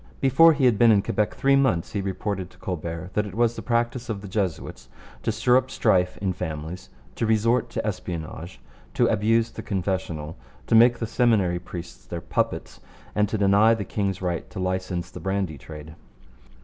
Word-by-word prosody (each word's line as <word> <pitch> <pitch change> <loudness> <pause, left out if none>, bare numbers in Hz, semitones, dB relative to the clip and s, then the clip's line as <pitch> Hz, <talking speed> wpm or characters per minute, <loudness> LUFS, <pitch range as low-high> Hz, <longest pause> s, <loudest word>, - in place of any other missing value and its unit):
Before 160 +5 +6
he 140 -3 +1
had 120 -5 +3
been 120 - +6
in 100 -2 +4
Quebec 105 0 -1
three 135 0 +3
months 130 -12 +1
he 100 - -2
reported 95 -1 -3
to - - -21
Colbert 85 0 -5
that 105 0 0
it 100 - -9
was 120 0 +2
the - - -6
practice 120 +1 -1
of 105 -3 -3
the 100 - -8
Jesuits 95 -4 -3 0.3
to - - 0
stir 125 +3 +3
up 130 0 0
strife 90 -1 +1
in 95 -2 -1
families, 80 0 -6 0.2
to 115 - -2
resort 115 +2 +2
to - - -4
espionage, 85 -3 -5 0.4
to - - +3
abuse 115 +2 +2
the - - -7
confessional, 90 -5 -3 0.3
to - - -2
make 120 +2 +6
the 115 - -3
Seminary 110 -7 +2
priests 85 -1 -9
their 85 - -6
puppets, 85 - -2 0.3
and 105 -1 +1
to 110 - -1
deny 105 +3 +5
the 105 -3 -4
king's 95 -1 -2
right 85 -2 -2
to 95 - -7
license 90 -1 -2
the - - -8
brandy 95 -6 -2
trade. 75 +1 -10
100 Hz, 190 wpm, -25 LUFS, 90-115 Hz, 0.4 s, Before